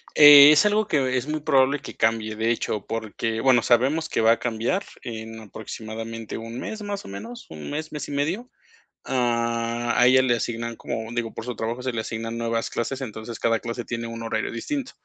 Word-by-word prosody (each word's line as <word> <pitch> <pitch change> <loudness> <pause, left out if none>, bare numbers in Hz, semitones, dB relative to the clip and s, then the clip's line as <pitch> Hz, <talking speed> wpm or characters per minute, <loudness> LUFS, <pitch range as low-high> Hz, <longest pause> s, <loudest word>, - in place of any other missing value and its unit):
Eh, 145 -1 +10
es 155 +6 +5
algo 210 0 +2
que 130 -4 +1
es 125 +2 -3
muy 155 0 -2
probable 140 -1 +3
que - - -9
cambie, 110 -1 0
de 110 +2 0
hecho, 105 -3 -2
porque, 115 0 -3
bueno, 130 -2 +5
sabemos 135 +8 +2
que - - 0
va 110 +1 +5
a - - -4
cambiar 120 - -1 0.2
en 110 -1 -7
aproximadamente 110 +1 -7
un 115 +2 -7
mes, 220 -1 -5
más 205 -1 -5
o - - -9
menos, 105 +5 -8
un 75 -2 -8
mes, 155 +2 -4
mes 150 - -5
y - - -7
medio. 170 - -2 0.5
Ah, 115 -1 0
a 120 - +6
ella 130 +1 +6
le 125 -2 +2
asignan, 115 0 -3
como, 110 0 -5
digo, 115 -2 -3
por - - -6
su 125 0 -5
trabajo 115 +3 -3
se 130 - -2
le 115 -2 -2
asignan 115 +1 -5
nuevas 115 -1 -1
clases, 135 +3 -3
entonces 110 -1 -7
cada 115 -1 +2
clase 120 0 -5
tiene 115 0 -4
un 115 0 -6
horario 110 -1 -2
distinto. 270 - -4
115 Hz, 205 wpm, -24 LUFS, 115-135 Hz, 0.5 s, Eh